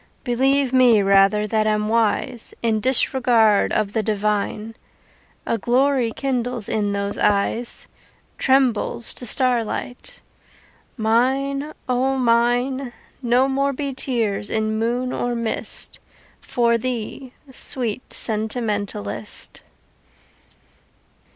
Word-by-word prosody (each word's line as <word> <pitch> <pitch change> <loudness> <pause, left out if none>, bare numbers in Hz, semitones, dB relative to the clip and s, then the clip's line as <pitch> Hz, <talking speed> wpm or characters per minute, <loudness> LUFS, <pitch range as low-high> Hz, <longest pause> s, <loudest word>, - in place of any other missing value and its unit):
Believe 265 +2 +1
me 245 -5 +5
rather 195 +2 +4
that 215 0 0
am 210 0 +1
wise 230 +2 0
In 220 -2 +1
disregard 240 -3 +4
of 205 -2 -1
the 220 - +1
divine, 210 +1 -2 0.7
A 230 - -1
glory 250 +1 +2
kindles 245 -4 -2
in 205 -2 0
those 200 0 -3
eyes 210 +4 0 0.5
Trembles 260 -4 +1
to 245 - -4
starlight. 245 0 -1 0.8
Mine, 265 +6 +1 0.2
O 260 +2 +1
Mine! 245 +2 +1 0.3
No 250 +1 +3
more 275 +1 0
be 280 0 -4
tears 225 -6 -2
in 220 0 -1
moon 245 +3 -1
or 245 0 -2
mist 230 -1 -3 0.4
For 235 -1 +1
thee, 250 +2 -5 0.2
sweet 250 -3 -4
sentimentalist. 210 - -3
235 Hz, 100 wpm, -21 LUFS, 215-255 Hz, 0.8 s, me